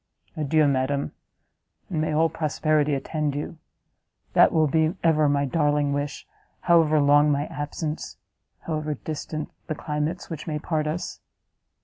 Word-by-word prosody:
Adieu, 155 0 +2
madam! 140 +1 0 0.8
and 165 -5 -2
may 155 - 0
all 160 +2 +3
prosperity 155 -2 +1
attend 150 +1 -2
you! 150 +2 -5 0.7
That - - +6
will 160 -1 +3
be 160 +4 +2
ever 155 -3 +4
my 140 0 +2
darling 145 0 +1
wish, 145 0 -3 0.4
however 165 -3 +4
long 145 +1 +5
my 145 +1 0
absence, 150 0 -5 0.4
however 155 -2 -2
distant 155 +1 -5 0.2
the 155 - -2
climates 150 +4 -3
which 160 -1 -7
may 155 -2 -1
part 155 0 -1
us!" 160 +3 -4
150 Hz, 135 wpm, -25 LUFS, 145-160 Hz, 0.8 s, That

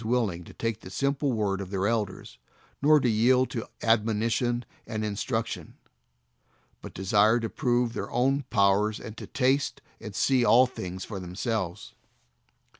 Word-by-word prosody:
141 120 +3 +2
willing 90 -2 -6
to - - -13
take 115 -2 -2
the 95 - -11
simple 140 +7 0
word 100 -4 -1
of 95 - -6
their 95 0 -1
elders, 105 -4 -3 0.4
nor 150 +2 +6
to 130 - +1
yield 125 +3 +3
to 115 - -4 0.2
admonition 115 +2 +1 0.2
and 110 -1 -3
in 105 -1 -3
struction, 115 +1 -3 1.0
but - - -8
desire 105 +5 +3
to 115 - -2
prove 120 -1 +1
their - - -4
own 135 +4 +1
powers, 105 +1 +2
and 110 - -8
to - - -8
taste 135 +1 +1 0.2
and 105 -3 -8
see 130 -2 +3
all 125 +2 +6
things 95 -7 -6
for 100 -3 -6
themselves. 90 0 -4
115 Hz, 160 wpm, -27 LUFS, 100-125 Hz, 1.0 s, nor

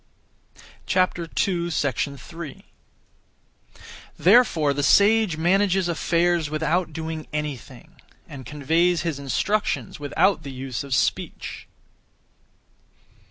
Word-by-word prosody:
3. 170 - -2 1.5
Therefore 175 - +4
the 145 - -2
sage 200 +3 +4
manages 190 +2 +2
affairs 170 -1 +1
without 160 +3 0
doing 160 0 -5
anything, 150 -4 -6 0.3
and 135 -2 -9
conveys 165 +6 +1
his 165 -5 -3
instructions 200 +11 -1
without 170 +7 +1
the 140 - -8
use 130 -1 -5
of 140 -2 -2
speech. - - -2
160 Hz, 80 wpm, -23 LUFS, 145-180 Hz, 1.5 s, Therefore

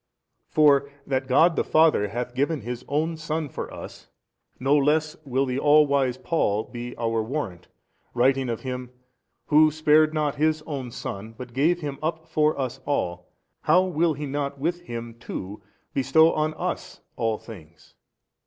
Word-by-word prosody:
For 140 -2 +4 0.2
that 130 -1 -1
God 165 +6 +4
the - - +1
Father 155 -10 +4
hath 120 +4 -4
given 140 +3 0
His 120 +2 -5
own 160 +3 -1
Son 155 -1 -3
for - - -6
us, - - -10 0.5
no 135 +3 +3
less 150 +2 +2
will 135 0 +1
the 130 0 -2
all 150 +1 +6
wise 135 -3 +1
Paul 110 -10 0
be 120 0 -8
our 115 -1 0
warrant, 110 - -4 0.5
writing 130 +1 +2
of. 115 - -3
Him, 125 -1 -5 0.6
Who 155 +1 +6
spared 155 0 +4
not 150 -2 -1
His 155 +1 +1
own 140 -5 -5
Son, 110 -1 -7
but 125 -2 -9
gave 165 +7 +2
Him 145 -2 -5
up 160 0 -3
for 155 -2 +1
us 130 -3 -3
all, 90 -11 -2 0.3
how 180 +4 +4
will 170 -3 +1
He 145 +1 -5
not 140 0 -3
with 170 +5 -2
Him 120 -7 -6
too 100 -2 -7 0.3
bestow 140 +4 +4
on 155 0 0
us - - -4
all 115 -2 0
things? 85 -9 -14
140 Hz, 160 wpm, -25 LUFS, 120-155 Hz, 0.6 s, all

